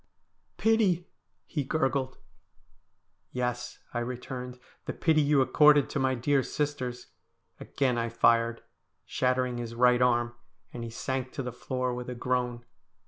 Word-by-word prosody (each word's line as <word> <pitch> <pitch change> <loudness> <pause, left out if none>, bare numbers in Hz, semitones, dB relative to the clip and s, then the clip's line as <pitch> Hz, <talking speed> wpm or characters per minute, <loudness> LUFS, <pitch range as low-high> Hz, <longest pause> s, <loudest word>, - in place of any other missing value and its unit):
' - - -45
Pity! 195 -6 +3 0.2
' - - -49
he 145 - +1
gurgled. 135 -2 -1 0.6
' - - -47 0.3
Yes,' 125 -1 -3 0.2
I 120 - -1
returned, 125 +1 -5
' - - -33
the - - -3
pity 160 -2 +3
you 145 -1 +4
accorded 145 +2 +5
to 140 - -1
my 130 0 +2
dear 135 +3 +2
sisters.' 130 - -3 0.5
Again 130 -4 0
I 115 0 -1
fired, 115 0 +2 0.4
shattering 125 -1 0
his 115 -1 -5
right 125 0 +4
arm, 120 -1 +2 0.4
and 120 - -5
he 115 - -5
sank 130 +2 -3
to 135 - -4
the 125 -1 -5
floor 125 0 -2
with 125 0 -5
a 125 - -4
groan. 125 -1 -1
125 Hz, 155 wpm, -29 LUFS, 120-135 Hz, 0.6 s, accorded